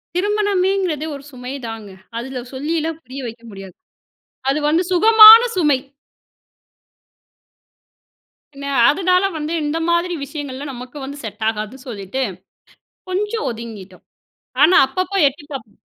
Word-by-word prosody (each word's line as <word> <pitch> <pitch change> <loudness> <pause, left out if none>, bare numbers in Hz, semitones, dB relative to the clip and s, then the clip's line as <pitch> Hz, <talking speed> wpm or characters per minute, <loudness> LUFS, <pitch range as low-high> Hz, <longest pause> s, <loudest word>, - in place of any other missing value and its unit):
திருமணமேங்றதே 385 -5 0
ஒரு 280 - -10
சுமை 250 0 -8
தாங்க. 225 -2 -8 0.3
அதுல 250 +2 -5
சொல்லில்லாம் 315 +3 -3
புரிய 255 +2 -9
வைக்க 230 +1 -10
முடியாது. 195 -2 -11 0.7
அது 275 +3 +1
வந்து 325 +4 +2
சுகமான 440 +4 +9 0.2
சுமை. 300 -6 +3 2.8
பின்ன, 280 0 -9 0.2
அதனால 365 +3 +2
வந்து 305 +1 -4
இந்த 295 +2 -2
மாதிரி 340 +1 +1
விஷயங்கள்லாம் 280 -1 -7
நமக்கு 250 +2 -10
வந்து 280 +2 -8
செட் 220 0 -7
ஆகாது 215 +3 -5
சொல்லீட்டு, 210 +2 -5 0.9
கொஞ்சம் 415 +4 -2
ஒதுங்கிட்டோம். 220 -5 -9 0.6
ஆனா 335 +5 +6
அப்பப்போ 370 +8 -3
எட்டி 285 +2 -12
பார்ப்போம். 225 -7 -9
285 Hz, 115 wpm, -19 LUFS, 245-360 Hz, 2.8 s, சுகமான